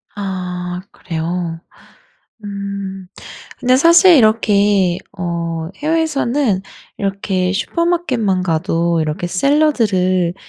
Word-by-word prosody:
아 180 Hz, -3 st, -4 dB
그래요? 165 Hz, 0 st, -4 dB, 0.9 s
음. 200 Hz, -2 st, -6 dB, 0.5 s
근데 255 Hz, 0 st, +3 dB
사실 335 Hz, +4 st, +6 dB
이렇게 205 Hz, -5 st, +3 dB, 0.2 s
어 170 Hz, -2 st, -3 dB
해외에서는 290 Hz, -, 0 dB, 0.3 s
이렇게 195 Hz, -2 st, -1 dB
슈퍼마켓만 255 Hz, -, 0 dB
가도 170 Hz, 0 st, 0 dB
이렇게 155 Hz, +2 st, -2 dB
샐러드를 185 Hz, -, +1 dB
195 Hz, 200 characters per minute, -17 LUFS, 180-245 Hz, 0.9 s, 사실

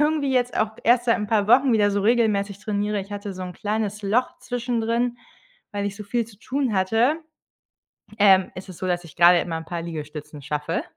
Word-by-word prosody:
irgendwie 295 Hz, -3 st, +1 dB
jetzt 250 Hz, -1 st, +1 dB
auch 220 Hz, 0 st, +1 dB
erst 240 Hz, +1 st, +4 dB
seit 230 Hz, -, +3 dB
’n 210 Hz, -, -3 dB
paar 205 Hz, -2 st, +1 dB
Wochen 255 Hz, +2 st, +5 dB
wieder 205 Hz, -2 st, +3 dB
so 200 Hz, -, 0 dB
regelmäßig 205 Hz, -3 st, +1 dB
trainiere, 210 Hz, 0 st, -1 dB
ich 195 Hz, +1 st, -9 dB
hatte 200 Hz, 0 st, -5 dB
so 185 Hz, 0 st, -7 dB
’n 180 Hz, 0 st, -6 dB
kleines 210 Hz, 0 st, -3 dB
Loch 230 Hz, +6 st, 0 dB
zwischendrin, 240 Hz, 0 st, -1 dB, 0.6 s
weil 205 Hz, 0 st, -2 dB
ich 200 Hz, 0 st, -5 dB
so 210 Hz, -, -7 dB
viel 230 Hz, +3 st, -1 dB
zu 210 Hz, -3 st, -17 dB
tun 260 Hz, -3 st, -1 dB
hatte. 225 Hz, +10 st, +2 dB, 1.0 s
Ähm, 190 Hz, -2 st, +5 dB
ist 185 Hz, -, -9 dB
es 185 Hz, -, -10 dB
so, 185 Hz, -, -3 dB
dass 175 Hz, -1 st, -1 dB
ich 165 Hz, -, -14 dB
grade 175 Hz, 0 st, +7 dB
immer 165 Hz, -2 st, -3 dB
’n 160 Hz, -, -6 dB
paar 170 Hz, +1 st, -5 dB
Liegestützen 150 Hz, -2 st, -7 dB
schaffe. 150 Hz, +4 st, -2 dB
205 Hz, 210 wpm, -23 LUFS, 185-235 Hz, 1.0 s, grade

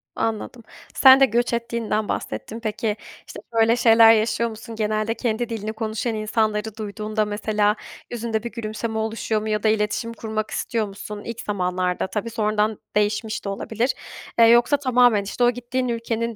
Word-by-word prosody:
Anladım. 225 Hz, +2 st, -3 dB, 0.3 s
Sen 265 Hz, 0 st, +8 dB
de 270 Hz, -, +7 dB
göç 240 Hz, 0 st, 0 dB
ettiğinden 235 Hz, -3 st, -1 dB
bahsettin. 225 Hz, +2 st, -4 dB
Peki, 215 Hz, -1 st, -2 dB, 0.3 s
işte, -, -, -9 dB
böyle 225 Hz, 0 st, +4 dB
şeyler 225 Hz, -1 st, +7 dB
yaşıyor 230 Hz, +1 st, +1 dB
musun? 225 Hz, +1 st, -9 dB
Genelde 215 Hz, +1 st, 0 dB
kendi 235 Hz, 0 st, -2 dB
dilini 220 Hz, -1 st, -4 dB
konuşan 220 Hz, +1 st, -2 dB
insanları 215 Hz, 0 st, -1 dB
duyduğunda 215 Hz, 0 st, -2 dB
mesela 210 Hz, 0 st, +1 dB, 0.4 s
yüzünde 230 Hz, -2 st, -2 dB
bir 235 Hz, -, -5 dB
gülümseme 220 Hz, 0 st, -4 dB
oluşuyor 220 Hz, 0 st, -1 dB
mu 215 Hz, -, -4 dB
ya 210 Hz, 0 st, -1 dB
da 215 Hz, -, +4 dB
iletişim 215 Hz, +2 st, 0 dB
kurmak 215 Hz, -1 st, -4 dB
istiyor 225 Hz, -3 st, -1 dB
musun? 205 Hz, +1 st, -8 dB
İlk 230 Hz, -1 st, -5 dB
zamanlarda 180 Hz, -2 st, -1 dB
tabii. 210 Hz, +4 st, -3 dB
Sonradan 215 Hz, -1 st, 0 dB, 0.2 s
değişmiş 210 Hz, +1 st, 0 dB
de -, -, -2 dB
olabilir. 225 Hz, +5 st, -1 dB, 0.5 s
Eee, 230 Hz, -, +9 dB
yoksa 240 Hz, +5 st, +5 dB
tamamen, 245 Hz, -6 st, +3 dB
işte, 225 Hz, +5 st, -2 dB
o 240 Hz, -, +5 dB
gittiğin 245 Hz, +1 st, -3 dB
ülkenin 230 Hz, -1 st, -2 dB
220 Hz, 160 wpm, -23 LUFS, 215-235 Hz, 0.5 s, Eee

